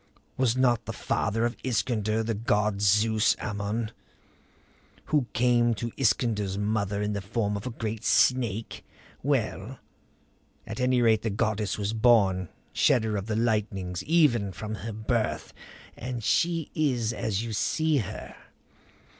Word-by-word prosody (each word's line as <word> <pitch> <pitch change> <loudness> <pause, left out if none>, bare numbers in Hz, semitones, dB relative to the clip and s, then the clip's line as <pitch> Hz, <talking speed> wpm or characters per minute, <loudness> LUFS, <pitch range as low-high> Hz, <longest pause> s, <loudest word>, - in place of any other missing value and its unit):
Was 130 -2 +1
not 120 -3 +2
the - - -5
father 115 +3 -1
of 120 - -1
Iskander 110 -3 0
the 115 +1 -1
god 105 -2 0
Zeus 105 +2 +3
Ammon, 105 +2 -3 1.2
who 145 -5 +3
came 120 -1 +3
to 115 +2 -4
Iskander's 105 -5 +1
mother 105 -1 -1
in 105 0 -1
the 100 - -3
form 105 +1 -1
of 100 +5 -5
a - - -2
great 110 -2 -5
snake? 115 -5 +1 0.4
Well? 125 -3 -1 0.9
At - - -6
any 125 -1 +2
rate 110 -2 +4
the 110 - -1
goddess 105 -1 -1
was 105 +1 -2
born 100 -6 +3 0.2
shedder 110 -3 +2
of 100 +1 -3
the 110 - -1
lightnings 105 -5 -1
even 140 - +3
from 110 +3 -6
her 110 +2 -5
birth. 110 +1 -2 0.4
And 125 -1 -5
she 165 +5 +1
is 125 -7 0
as 110 -2 -2
you 115 -1 -4
see 155 +8 +1
her. 110 -3 -5
110 Hz, 140 wpm, -27 LUFS, 105-120 Hz, 1.2 s, rate